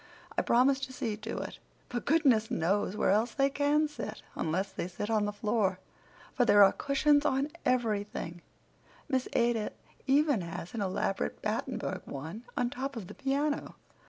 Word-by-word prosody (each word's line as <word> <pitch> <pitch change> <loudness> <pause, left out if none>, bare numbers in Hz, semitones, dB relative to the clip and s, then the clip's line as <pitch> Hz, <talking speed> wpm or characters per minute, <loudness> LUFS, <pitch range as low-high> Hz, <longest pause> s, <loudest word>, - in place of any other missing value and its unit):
I - - +2
promised 265 +3 +3
to 260 - -12
see 225 -4 -2
to 225 +2 -5
it; - - -6 0.3
but 240 -1 -3
goodness 265 -9 +4
knows 195 +4 0
where - - +3
else 220 +4 +2
they 275 0 +3
can 290 +2 +2
sit, 295 - -7
unless 185 +5 -1
they - - -4
sit 205 +4 -4
on 215 -2 +2
the 205 - -1
floor, 205 -2 0 0.6
for 245 - +3
there 205 -4 +7
are 195 - +7
cushions 290 +1 +2
on 275 0 +1 0.2
everything. 210 -8 -1 0.7
Miss 260 -4 0
Ada 235 -2 +1 0.3
even 285 -4 +4
has 170 0 -6
an 230 - -3
elaborate 195 0 -1
Battenburg 215 -3 -3
one 160 - -7
on 245 0 +1
top 275 0 -4
of 225 -5 -5
the - - -7
piano." 285 +2 -1
230 Hz, 165 wpm, -31 LUFS, 205-275 Hz, 0.7 s, there